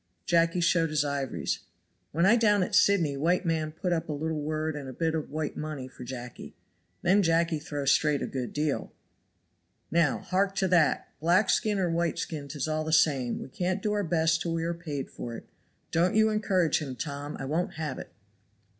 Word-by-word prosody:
Jacky 170 0 +2
showed 165 -1 +3
his 150 -1 +1
ivories. 135 - -2 0.5
"When 170 +4 +2
I 215 +5 +6
down 210 -4 +4
at 195 - -4
Sydney 200 -9 +4
white 175 +6 +1
man 160 -2 0
put 175 +3 -2
up 165 -1 -2
a - - -1
little 155 +1 -2
wood 155 +1 -2
and 140 -3 -6
a - - -7
bit 160 +3 0
of 160 -2 -3
white 155 0 -3
money 150 -4 -5
for 125 -1 -11
Jacky. 125 -1 -8 0.5
Then 190 +4 +4
Jacky 165 -2 +2
throw 145 -1 -4
straight 145 +1 +3
a - - 0
good 125 -3 -4
deal." 150 -1 -1 1.0
"Now 165 -3 +3
hark 195 +1 0
to 190 -1 +1
that! 170 -4 +3
black 180 +6 +3
skin 210 -2 +1
or 180 -3 +1
white 170 0 0
skin 150 -3 -4
'tis 145 0 -3
all 155 0 -1
the 160 - -3
same; 135 -6 +3
we - - -9
can't 185 +7 -2
do 210 - +1
our 205 -1 0
best 165 -1 +2
till 165 -1 -1
we 165 - -1
are 170 +1 -1
paid 150 -5 -5
for 120 -1 -6
it. - - -10 0.4
Don't 175 +4 +2
you 220 0 +4
encourage 190 -7 +2
him, 135 -5 -5
Tom, 145 +2 -5
I 135 - -4
won't 160 +6 -1
have 155 -4 -4
it." - - -9
160 Hz, 205 wpm, -28 LUFS, 145-175 Hz, 1.0 s, I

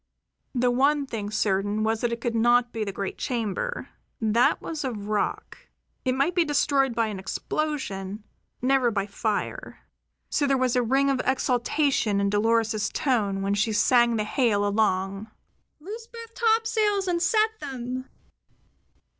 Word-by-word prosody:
The 245 0 +2
one 280 +3 +2
thing 215 -6 -5
certain 205 0 0
was 220 0 0
that 240 - 0
it 235 0 -4
could 240 -1 -1
not 240 +1 +3
be 225 - -2
the 200 - -3
great 195 0 -5
chamber. 240 - -3 0.3
That 225 +2 +3
was 315 -2 -5
of 225 -6 -4
rock; 210 -1 -2 0.4
it 255 -1 +1
might 275 +7 +1
be 350 -1 +3
destroyed 280 -4 +1
by 230 0 +2
an 210 -3 -4
explosion; 205 -5 -3 0.4
never 260 -1 +3
by 200 -3 -1
fire. 215 - -3 0.5
So 285 - +1
there 275 -1 +3
was 255 -1 +1
a 250 - +3
ring 270 +4 +2
of 260 -2 0
exultation 255 -3 +1
in 200 0 +1
Dolores's 220 0 +1
tone 205 -8 0
when 200 +1 0
she 215 +2 +1
sent 235 +2 +4
the 215 - 0
hail 210 -2 +1
along: 200 0 0 0.5
"Loose 435 +8 -8
both 460 -1 -11
topsails 445 -4 +1
and 345 -1 0
set 435 +3 +2
them! 255 -2 -5
240 Hz, 155 wpm, -26 LUFS, 210-280 Hz, 0.5 s, sent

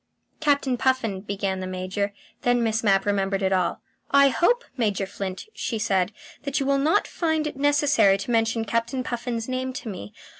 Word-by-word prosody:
"Captain 285 -4 +2
Puffin," 235 -7 0
began 195 -1 -2
the 185 - -4
Major. 185 +2 -2 0.3
Then 245 -1 +2
Miss 225 0 0
Mapp 195 -2 +3
remembered 195 -1 0
it 190 0 +2
all. 180 -2 0 0.3
"I 280 0 +6
hope, 410 - +2
Major 205 -6 0
Flint," 190 -1 -5
she 230 - -3
said, 195 -3 +1 0.3
"that 280 0 -1
you 275 - -1
will 275 0 +2
not 320 +9 +3
find 320 -2 0
it 300 - -3
necessary 285 -8 +4
to 200 +5 -5
mention 225 0 +1
Captain 230 +4 -1
Puffin's 235 -2 -3
name 260 0 -2
to 245 - -6
me. 105 - -7
230 Hz, 180 wpm, -25 LUFS, 195-275 Hz, 0.3 s, I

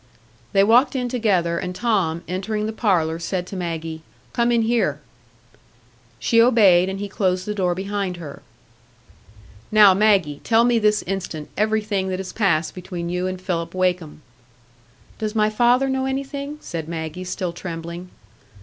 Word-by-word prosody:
They 195 -1 +4
walked 245 +7 +4
in 250 -2 -1
together, 190 -9 +1
and 180 0 -5
Tom, 185 -8 0
entering 195 +4 -2
the 220 - -3
parlour, 170 -8 +1
said 180 +1 -3
to 195 - -8
Maggie, 165 -3 -4 0.3
"Come 235 0 +2
in 235 -1 +3
here." 235 +1 +1 1.2
She 230 -2 +3
obeyed, 200 -7 +5
and 190 0 -4
he 205 - -3
closed 185 -2 -1
the 210 - -2
door 180 -4 0
behind 195 -1 -3
her. 155 -5 -9 1.3
"Now, 210 -3 +7
Maggie, 190 -8 +2
tell 230 0 +4
me 240 -1 +3
this 210 -1 +2
instant 175 -5 -5
everything 215 -2 0
that 185 - -2
has 190 -1 -6
passed 170 -7 +1
between 175 -2 -6
you 180 +1 -1
and 185 0 -4
Philip 170 -2 -3
Wakem." 180 -5 -1 1.0
"Does 215 0 -3
my 215 0 +2
father 245 +4 +3
know 265 0 -1
anything?" 275 +2 -4
said 160 -2 -5
Maggie, 160 +1 -5
still 185 -1 -3
trembling. 170 +1 -7
190 Hz, 155 wpm, -22 LUFS, 175-220 Hz, 1.3 s, Now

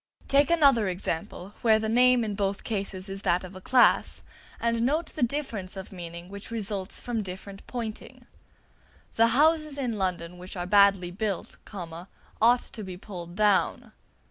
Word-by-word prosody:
Take 280 0 +4
another 280 - +4
example, 180 +1 -4
where 220 -2 +5
the 220 0 -2
name 250 +2 +5
in 215 -2 -2
both 195 -1 -2
cases 195 -3 -4
is 195 0 -6
that 180 -1 +1
of 185 +1 -9
a 185 - -9
class, 255 +5 +3 0.4
and 230 0 0
note 300 +7 0
the - - -6
difference 235 -8 -2
of 190 - -8
meaning 170 -2 -8
which 200 +1 -9
results 205 -4 -3
from 240 -3 -2
different 195 +1 -8
pointing: 230 -3 -6 0.9
"The 230 +1 +4
houses 305 +4 +3
in 240 -6 -2
London 180 -2 -2
which 185 +1 -8
are 175 - -3
badly 195 -2 +4
built, 200 -1 -3 0.9
ought 240 +2 +5
to 220 - -7
be 185 -2 -7
pulled 175 -3 -9
down." 205 -1 +2
205 Hz, 160 wpm, -27 LUFS, 185-235 Hz, 0.9 s, where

